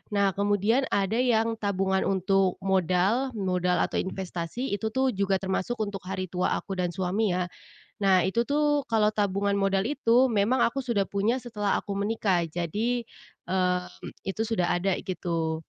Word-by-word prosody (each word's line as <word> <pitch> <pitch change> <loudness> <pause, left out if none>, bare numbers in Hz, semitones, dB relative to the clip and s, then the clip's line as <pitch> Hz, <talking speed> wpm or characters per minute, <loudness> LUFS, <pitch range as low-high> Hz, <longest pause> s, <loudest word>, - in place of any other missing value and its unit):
Nah, 200 -1 +3
kemudian 205 +5 +2
ada 200 +2 +1
yang 230 -2 +2
tabungan 195 -1 0
untuk 195 -1 +2
modal, 190 +7 +2
modal 180 -2 0
atau - - -3
investasi 190 +5 -4
itu 220 +2 -3
tuh 260 +1 +1
juga 195 -1 +1
termasuk 190 +5 -2
untuk 205 -2 -2
hari 185 0 -4
tua 180 0 0
aku 195 - -6
dan 180 - +1
suami 190 +3 0
ya. 180 -1 -1 0.6
Nah, 185 -3 +5
itu 230 +5 +1
tuh 295 0 +2
kalau 215 -1 +3
tabungan 200 0 +1
modal 195 0 +2
itu 260 -3 +3
memang 220 +5 +2
aku 270 +4 +1
sudah 225 -6 +1
punya 215 +6 0
setelah 210 -4 -1
aku 200 - -7
menikah, 200 -4 +1
jadi, 210 +9 -2 0.4
eee, 180 -1 +1 0.5
itu 195 +3 -2
sudah 185 -6 0
ada 195 0 +1
gitu. 165 -3 -2
200 Hz, 155 wpm, -27 LUFS, 185-225 Hz, 0.6 s, Nah